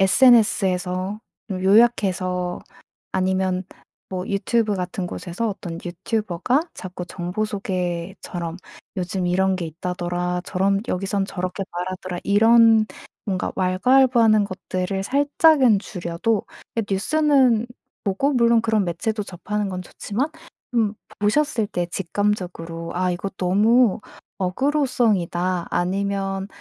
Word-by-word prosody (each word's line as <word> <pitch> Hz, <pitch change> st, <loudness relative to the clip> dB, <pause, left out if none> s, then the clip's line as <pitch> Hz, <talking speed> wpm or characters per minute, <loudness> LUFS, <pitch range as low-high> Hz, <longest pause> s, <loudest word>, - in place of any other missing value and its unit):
SNS에서 195 Hz, -4 st, +3 dB, 0.3 s
어 195 Hz, -, -1 dB
요약해서 190 Hz, -4 st, +2 dB, 0.5 s
아니면 185 Hz, 0 st, 0 dB, 0.5 s
뭐 185 Hz, 0 st, -4 dB
유튜브 210 Hz, +2 st, +1 dB
같은 180 Hz, 0 st, -3 dB
곳에서 190 Hz, +6 st, -4 dB
어떤 175 Hz, -4 st, -6 dB
유튜버가 205 Hz, -, -1 dB
자꾸 180 Hz, -1 st, -7 dB
정보 180 Hz, +4 st, -3 dB
소개처럼 180 Hz, -3 st, -4 dB, 0.4 s
'요즘 180 Hz, 0 st, -2 dB
이런 190 Hz, +1 st, +2 dB
게 180 Hz, -, -3 dB
있다더라, 180 Hz, +2 st, -3 dB
저런 195 Hz, +1 st, +1 dB
여기선 195 Hz, +1 st, -1 dB
저렇게 185 Hz, +1 st, -4 dB
말하더라.' 180 Hz, 0 st, -4 dB
이런 225 Hz, +1 st, +5 dB, 0.4 s
뭔가 190 Hz, -4 st, -2 dB
왈가왈부하는 225 Hz, +3 st, +4 dB
것들을 185 Hz, 0 st, -3 dB
살짝은 280 Hz, -3 st, +4 dB
줄여도 180 Hz, +3 st, -2 dB, 0.3 s
그 230 Hz, -, +1 dB
뉴스는 255 Hz, +1 st, +3 dB, 0.4 s
뭐 195 Hz, -, +1 dB
꼭 280 Hz, 0 st, +1 dB
물론 235 Hz, -1 st, +4 dB
그런 220 Hz, -2 st, +1 dB
매체도 210 Hz, +5 st, -2 dB
접하는 205 Hz, +2 st, -3 dB
건 185 Hz, -1 st, -4 dB
좋지만 215 Hz, -, -3 dB, 0.5 s
음 220 Hz, -3 st, +2 dB, 0.3 s
보셨을 220 Hz, +1 st, +1 dB
때 175 Hz, -3 st, -2 dB
직감적으로 175 Hz, -3 st, -3 dB
'아 185 Hz, +1 st, +1 dB
이거 185 Hz, +3 st, -3 dB
너무 210 Hz, +4 st, +3 dB, 0.4 s
어그로성이다.' 195 Hz, -, 0 dB
아니면 195 Hz, +1 st, -1 dB
195 Hz, 270 characters per minute, -22 LUFS, 180-220 Hz, 0.5 s, 이런